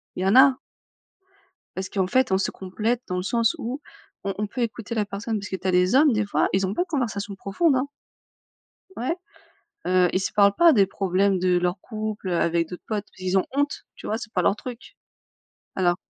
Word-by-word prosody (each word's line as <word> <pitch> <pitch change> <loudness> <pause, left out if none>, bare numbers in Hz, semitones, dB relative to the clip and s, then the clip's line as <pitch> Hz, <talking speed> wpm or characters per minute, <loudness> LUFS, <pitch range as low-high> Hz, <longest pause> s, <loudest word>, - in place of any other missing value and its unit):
Il 185 - -4
y - - 0
en 195 +5 +3
a. 265 0 +7 1.2
Parce 190 0 -4
qu'en 190 -2 0
fait, 255 0 +2
on 190 - +4
se 195 - -1
complète 215 +6 -2
dans 180 - -2
le 180 - -2
sens 230 +2 +1
où 255 +6 -4 0.4
on 195 -1 -2
on 210 0 -1
peut 245 +4 -5
écouter 230 0 -3
la 210 - +1
personne, 210 +2 -3
parce 205 - -7
que - - -2
tu 190 - -5
as 185 - +3
des 180 +6 +3
hommes 290 0 +6
des 215 -1 +1
fois, 200 - +1
ils 190 0 +2
ont 195 - -2
pas - - 0
de - - -17
conversation 220 -9 -2
profonde, 265 - +1
hein? 265 +2 -1 1.1
Ouais. 255 +8 -1 0.7
Heu, 180 -1 +4
ils 185 - +1
se 185 - -2
parlent 200 -1 +5
pas 340 +3 +6
des 200 -6 +5
problèmes 195 0 +1
de 180 0 +2
leurs 180 +1 -1
couples, 215 -3 -5
heu, 175 - 0
avec 170 -1 +1
d'autres 180 - -9
potes 210 -2 -2
parce - - -28
qu'ils 185 +1 +1
ont - - -1
honte, 285 +1 -1
tu - - -10
vois? 220 - -1
C'est 225 -2 -9
pas 180 - +1
leur 195 - +3
truc. 245 +2 -9 0.8
Alors. 175 -2 +2
200 Hz, 225 wpm, -24 LUFS, 185-235 Hz, 1.2 s, a